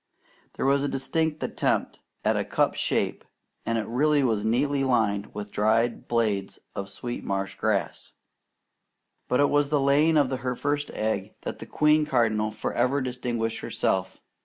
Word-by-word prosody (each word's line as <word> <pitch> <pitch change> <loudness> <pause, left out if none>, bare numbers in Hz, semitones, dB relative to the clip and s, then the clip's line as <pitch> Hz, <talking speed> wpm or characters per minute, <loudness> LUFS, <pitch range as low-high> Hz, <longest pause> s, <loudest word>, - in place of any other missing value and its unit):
There - - -3
was 140 +1 +3
a 145 - 0
distinct 155 +3 -1
attempt - - -1 0.3
at - - +3
a - - +1
cup - - +1
shape, - - -1 0.4
and 115 0 +1
it 110 - -1
really 145 +4 +2
was 110 -5 +1
neatly 135 +5 +1
lined 105 -6 +1
with 105 0 -6
dried 110 +3 +1
blades 105 -5 0 0.2
of 100 0 -5
sweet 120 +4 -5
marsh 95 0 -2
grass. 110 -3 -2 1.1
But 125 - +1
it 145 - +4
was 145 0 +3
in - - -14
the 150 -1 +2
laying 145 +4 +4
of 140 -3 +3
her 125 -1 -2
first 145 +2 -1
egg 110 +1 -2
that - - -5
the - - -8
queen 150 0 +3
cardinal 110 -5 +2
forever 125 +5 0
distinguished 120 -3 -2
herself. 95 0 -1
125 Hz, 160 wpm, -26 LUFS, 110-140 Hz, 1.1 s, it